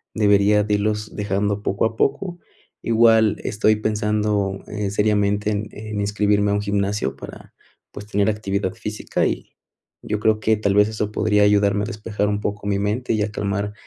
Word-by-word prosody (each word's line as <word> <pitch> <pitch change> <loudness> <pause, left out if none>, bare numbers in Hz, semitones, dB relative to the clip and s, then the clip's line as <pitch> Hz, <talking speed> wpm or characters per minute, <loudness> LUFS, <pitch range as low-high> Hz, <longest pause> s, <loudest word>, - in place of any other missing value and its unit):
debería 105 0 +4
de 105 0 -1
irlos 105 +1 -2
dejando 100 0 -1
poco 100 +2 0
a 110 - -2
poco. 175 +9 -1 0.4
Igual 115 -2 +4
estoy 110 +1 +2
pensando, 105 -2 0
eh, 105 -1 -3
seriamente 105 0 +1
en 105 +1 -2
en 105 -1 -6
inscribirme 105 0 +1
a - - +1
un 105 - 0
gimnasio 100 -7 -1
para, - - -11 0.4
pues, 105 - -9
tener 105 0 +1
actividad 100 -2 -2
física 105 -2 -2
y - - -3 0.5
y - - -11
yo 105 - 0
creo 110 0 +2
que, 110 0 +2
tal 100 -2 0
vez, 105 +1 +5
eso 105 -1 -3
podría 105 -1 +2
ayudarme 105 0 +3
a - - -1
despejar 105 -2 -3
un 105 0 -1
poco 105 -1 -4
mi 100 -1 +1
mente 110 +5 -1
y 110 -1 +1
a 105 - -3
calmar 100 0 -2
105 Hz, 180 wpm, -21 LUFS, 100-110 Hz, 0.5 s, vez